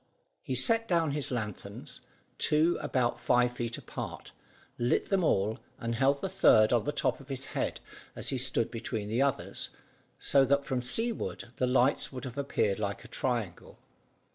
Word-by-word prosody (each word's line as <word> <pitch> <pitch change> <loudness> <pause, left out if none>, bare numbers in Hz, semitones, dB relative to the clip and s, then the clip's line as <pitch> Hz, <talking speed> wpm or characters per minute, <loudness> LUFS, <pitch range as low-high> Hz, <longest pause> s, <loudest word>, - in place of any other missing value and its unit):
He 130 - -3
set 225 - +3
down 165 -4 +2
his 145 0 -2
lanthorns, 110 -6 -6 0.4
two 160 +3 +3
about 120 -2 0
five 120 0 +2
feet 120 -1 -4
apart, - - -7 0.5
lit 120 +1 +1
them 195 -2 +2
all, 105 -7 +1 0.2
and 115 0 -3
held 135 +4 +2
the - - -1
third 125 - +5
on 115 -3 +2
the - - 0
top 135 -4 0
of 135 - -14
his 135 -1 -2
head - - -2 0.4
as - - -1
he 130 - -1
stood 130 -2 +3
between 110 -2 -4
the 115 +4 +1
others, 140 -1 -1 0.5
so 140 -1 +4
that 140 +1 +2
from 130 -3 -1
seaward 225 - -1
the 125 - +1
lights 130 +2 +2
would 130 -2 -7
have 130 +1 -6
appeared 110 -7 0
like 100 +2 -3
a - - -9
triangle. 115 -8 -3
125 Hz, 170 wpm, -30 LUFS, 115-140 Hz, 0.5 s, third